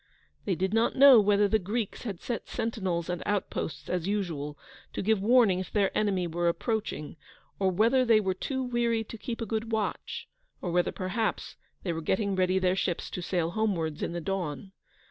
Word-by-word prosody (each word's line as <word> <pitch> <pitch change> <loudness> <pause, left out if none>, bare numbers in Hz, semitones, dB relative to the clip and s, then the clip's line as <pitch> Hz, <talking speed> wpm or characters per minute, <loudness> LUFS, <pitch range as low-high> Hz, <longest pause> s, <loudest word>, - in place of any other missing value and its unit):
They 190 - +1
did 190 +3 -1
not 225 +1 +2
know 275 -3 +9
whether 205 0 +4
the 220 +2 +2
Greeks 210 +3 -3
had 200 -7 -5
set 235 - -4
sentinels 185 -7 -2
and 180 -1 -3
outposts, 200 -7 -2
as 180 -1 -2
usual, 165 -8 -2 0.4
to - - -3
give 215 0 +2
warning 220 -4 +5
if 185 - -6
the 200 -2 +1
enemy 195 -4 +1
were 175 +1 -1
approaching; 170 - -2 0.4
or 190 -1 +3
whether 230 +8 +3
they 230 -3 +5
were 190 -3 0
too 265 +7 -3
weary 235 -2 0
to 225 - -9
keep 230 +1 -5
a - - -1
good 225 +1 -3
watch; 220 -1 -2 0.3
or 175 - -3
whether 175 0 +2
perhaps 210 +4 -2 0.3
they 175 - -1
were 165 - -4
getting 195 +4 0
ready 185 0 +2
their 185 -1 +2
ships 180 -2 -2
to 180 - -4
sail 170 -1 -1
homewards 175 -7 -1
in - - -2
the 175 - -3
dawn. 185 -2 -3
195 Hz, 190 wpm, -29 LUFS, 180-220 Hz, 0.4 s, know